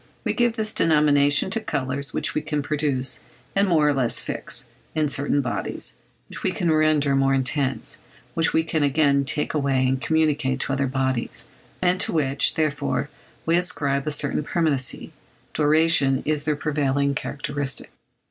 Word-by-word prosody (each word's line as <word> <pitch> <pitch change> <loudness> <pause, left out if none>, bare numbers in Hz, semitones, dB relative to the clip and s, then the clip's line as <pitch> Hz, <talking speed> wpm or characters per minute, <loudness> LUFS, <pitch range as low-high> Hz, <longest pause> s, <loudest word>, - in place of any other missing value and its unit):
We - - -1
give 240 -2 +1
this 215 -1 -3
denomination 150 0 +3
to 225 - +1
colours 140 -6 -2
which - - -1
we 155 - -1
can 150 -1 -3
produce, 140 -4 0 0.4
and 200 +1 +3
more 155 -4 +3
or 145 - +3
less 130 -4 +2
fix, - - -2 0.3
in 155 -2 +1
certain 145 +1 0
bodies; 125 -3 -2 0.3
which - - -10
we - - +1
can 170 -2 0
render 155 -3 +2
more 135 0 +2
intense, 130 -2 -1 0.3
which 165 -1 +1
we 160 - +2
can 160 -1 -1
again 140 -1 +2
take 150 +1 -1
away 135 -3 +1
and 130 0 -1
communicate 150 -3 +1
to 135 - -1
other 140 0 0
bodies, 130 -2 -2 0.4
and 180 0 +2
to - - +1
which, 140 -3 +1
therefore, 140 -3 -1 0.4
we 165 - +2
ascribe 145 -5 +1
a - - +2
certain 145 0 +1
permanency: 145 -5 -1 0.4
duration 150 -3 +3
is 150 -1 -1
their 150 -1 +1
prevailing 140 -2 0
characteristic. 140 +1 -4
145 Hz, 160 wpm, -23 LUFS, 135-155 Hz, 0.4 s, denomination